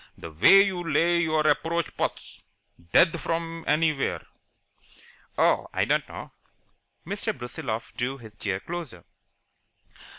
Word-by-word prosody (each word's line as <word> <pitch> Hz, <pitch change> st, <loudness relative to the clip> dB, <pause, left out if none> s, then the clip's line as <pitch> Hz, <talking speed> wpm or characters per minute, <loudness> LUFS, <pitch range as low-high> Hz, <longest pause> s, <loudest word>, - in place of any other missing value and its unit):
The 85 Hz, -, -9 dB
way 135 Hz, -, +7 dB
you 190 Hz, -3 st, -2 dB
lay 170 Hz, +3 st, +3 dB
your 155 Hz, -2 st, +1 dB
approach 165 Hz, +3 st, 0 dB
putts -, -, -4 dB, 0.5 s
dead 170 Hz, -1 st, +4 dB
from 165 Hz, 0 st, -3 dB
anywhere!" 155 Hz, -2 st, +1 dB, 1.1 s
"Oh, -, -, +3 dB
I -, -, 0 dB
don't -, -, 0 dB
know." -, -, -9 dB, 0.7 s
Mr. 200 Hz, -4 st, -3 dB
Brusiloff 120 Hz, -2 st, -5 dB
drew 130 Hz, +3 st, -2 dB
his 110 Hz, -4 st, -13 dB
chair 100 Hz, -3 st, -3 dB
closer. 160 Hz, -, -7 dB
155 Hz, 120 wpm, -26 LUFS, 120-170 Hz, 1.1 s, way